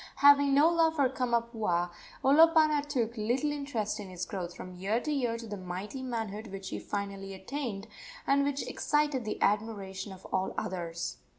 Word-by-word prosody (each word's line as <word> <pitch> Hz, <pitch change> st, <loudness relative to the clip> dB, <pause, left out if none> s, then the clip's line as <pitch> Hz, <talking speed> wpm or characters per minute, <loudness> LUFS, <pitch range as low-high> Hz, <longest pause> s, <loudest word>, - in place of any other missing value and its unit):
Having 285 Hz, -1 st, +6 dB
no 295 Hz, +3 st, +7 dB
love 330 Hz, -1 st, +3 dB
for 280 Hz, -4 st, +4 dB
Kamapuaa, 235 Hz, -8 st, 0 dB, 0.3 s
Olopana 310 Hz, +1 st, +6 dB
took 240 Hz, -5 st, -1 dB
little 245 Hz, +8 st, +1 dB
interest 240 Hz, -8 st, -2 dB
in 200 Hz, -2 st, -7 dB
his 180 Hz, 0 st, -4 dB
growth 175 Hz, -3 st, -5 dB
from 185 Hz, -, -8 dB
year 195 Hz, +6 st, 0 dB
to 300 Hz, -, -3 dB
year 245 Hz, -5 st, 0 dB
to 230 Hz, -, -8 dB
the 210 Hz, -2 st, -5 dB
mighty 185 Hz, +7 st, -5 dB
manhood 225 Hz, -4 st, -4 dB
which 195 Hz, -1 st, -7 dB
he -, -, -4 dB
finally 195 Hz, -1 st, -4 dB
attained, 210 Hz, 0 st, -4 dB, 0.4 s
and 280 Hz, +1 st, +4 dB
which 285 Hz, 0 st, -1 dB
excited 295 Hz, -5 st, +1 dB
the 215 Hz, -, -3 dB
admiration 205 Hz, -2 st, -1 dB
of 190 Hz, 0 st, -11 dB
all 190 Hz, 0 st, 0 dB
others. 170 Hz, -, -3 dB
225 Hz, 170 wpm, -30 LUFS, 195-280 Hz, 0.4 s, no